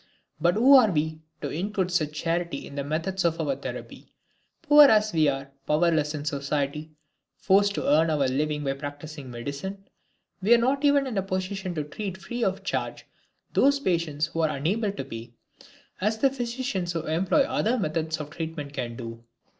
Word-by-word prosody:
But 175 +2 +3
who 260 +6 +7
are 235 -5 +6
we, 160 -2 -1 0.2
to 145 - -2
include 190 +2 -2
such 155 -4 0
charity 165 -1 -2
in - - -11
the 140 0 -3
methods 165 +6 -2
of 165 -1 +1
our 275 - 0
therapy? - - -8 0.5
Poor 295 -2 +8
as 215 -4 +4
we 155 -2 +4
are, 135 0 -2 0.2
powerless 155 -1 +2
in 145 -1 -5
society, 145 +1 -2 0.5
forced 200 +1 +3
to - - -2
earn 155 +3 +4
our 145 -4 +2
living 150 +3 -1
by 135 -1 0
practicing 145 0 -8
medicine, 140 +12 -6 0.5
we 220 +5 +6
are - - +5
not 265 +4 +1
even 285 -1 +4
in 235 -7 -1
a - - +1
position 185 -1 -3
to 155 - -1
treat 190 +5 -6
free 235 +7 -4
of 195 -1 -1
charge - - -3 0.5
those 280 +1 +4
patients 170 - 0
who 165 +1 -6
are 160 -1 +3
unable 200 +9 0
to 200 - -6
pay, 115 +1 -8 0.7
as 215 +3 +1
physicians 245 -7 -1
who 165 - -2
employ 180 - +2
other 245 -1 0
methods 160 -4 -1
of 150 0 -6
treatment 160 -3 -5
can 120 -4 -4
do. 115 -1 -8
165 Hz, 180 wpm, -26 LUFS, 150-205 Hz, 0.7 s, Poor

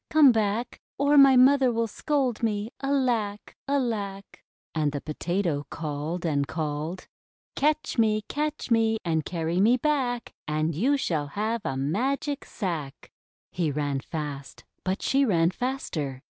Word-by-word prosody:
Come 305 -4 +7
back! 220 +1 -1 0.2
Or 285 +1 +3
my 275 -2 +8
mother 260 0 +6
will 230 0 0
scold 260 +1 -1
me. 215 -1 -1
Alack! 245 -7 -1
Alack!" 215 -8 -2 0.3
And 155 -2 +1
the 145 - -2
Potato 165 -1 -2
called 160 +2 -4
and 140 -3 +1
called: 155 +3 -4 0.2
— - - -71
"Catch 295 -2 0
me! 215 -1 +3
Catch 300 -2 -3
me! 225 -1 +3
And 160 -2 0
carry 170 +1 -1
me 235 +5 +5
back! 255 -4 -1
And 155 +2 0
you 255 - +2
shall 155 - -1
have 215 +8 -2
a 135 - -2
Magic 265 - -1
Sack!'' 165 - -5 0.4
He 170 -3 0
ran 145 -1 -1
fast, 145 -2 -6 0.2
but 190 +1 -2
she 275 +1 +3
ran 170 -8 +3
faster. 160 - -3
205 Hz, 145 wpm, -26 LUFS, 155-255 Hz, 0.4 s, my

